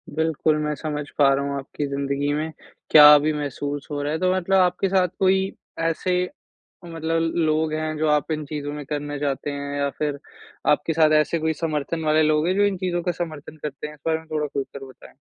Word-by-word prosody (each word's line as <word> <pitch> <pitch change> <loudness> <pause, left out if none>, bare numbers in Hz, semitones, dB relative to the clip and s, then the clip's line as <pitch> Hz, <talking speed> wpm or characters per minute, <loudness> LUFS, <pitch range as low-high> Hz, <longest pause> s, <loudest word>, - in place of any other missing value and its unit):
बिल्कुल, 160 -1 +1
मैं 150 0 -1
समझ 150 -1 -4
पा 140 -2 +5
रहा 140 +1 0
हूँ 140 0 -2
आपकी 140 +1 -5
जिंदगी 140 +1 -1
में 155 +2 -2 0.4
क्या 150 -1 +10
अभी 150 +1 +2
महसूस 145 -1 -4
हो 145 -1 -2
रहा 145 +1 -2
है 160 - -2
तो 185 0 +2
मतलब 185 +1 +1
आपके 180 +1 +2
साथ 185 -1 +3
कोई 190 0 +2 0.3
ऐसे 165 +2 0 0.6
मतलब 165 0 -1
लोग 155 -1 +1
हैं, 155 0 -2
जो 155 +1 0
आप 150 +1 +1
इन 155 -1 -2
चीज़ों 145 0 -5
में 150 -1 -6
करना 145 0 -4
चाहते 145 0 -2
हैं? 140 0 -4
या 140 0 0
फिर 145 0 -3 0.5
आपके 165 - +2
साथ 155 -1 +4
ऐसे 165 +2 0
कोई 160 0 0
समर्थन 160 +1 -3
वाले 155 +1 +4
लोग 155 +1 +2
है 185 - +2
जो 205 - +3
इन 200 -2 0
चीज़ों 175 -1 -1
का 180 - 0
समर्थन 155 -3 -6
करते 150 0 -5
हैं? 150 - -10
इस 150 - -18
बारे 160 0 +1
में 160 - -17
थोड़ा 150 -1 -1
खुलकर 140 -1 -5
बताएँ। 130 - -15
155 Hz, 215 wpm, -23 LUFS, 145-165 Hz, 0.6 s, क्या